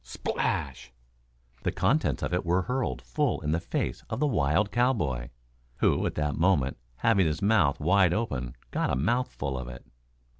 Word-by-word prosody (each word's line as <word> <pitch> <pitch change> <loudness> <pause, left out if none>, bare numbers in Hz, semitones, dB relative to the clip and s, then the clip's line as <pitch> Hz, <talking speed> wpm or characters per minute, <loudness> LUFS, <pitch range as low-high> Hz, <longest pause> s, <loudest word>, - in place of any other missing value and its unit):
Splash! - - -3 0.7
The - - 0
contents 155 +3 +1
of - - -2
it 90 - +1
were 90 +1 +1
hurled 125 +3 -2
full 150 -4 0
in 75 0 -1
the 80 - +1
face 60 - -3
of 110 - -3
the 150 - +2
wild 100 - +2
cowboy, 105 - 0 0.5
who - - +2
at - - -4
that 75 -1 0
moment, 80 -6 +2 0.2
having 100 - +3
his 75 +4 -2
mouth 100 -10 +3
wide 90 +3 +4
open, 70 - -2 0.2
got - - 0
a - - +1
mouthful 75 - -1
of 65 -1 -5
it. 60 -1 -9
85 Hz, 165 wpm, -28 LUFS, 70-115 Hz, 0.7 s, wide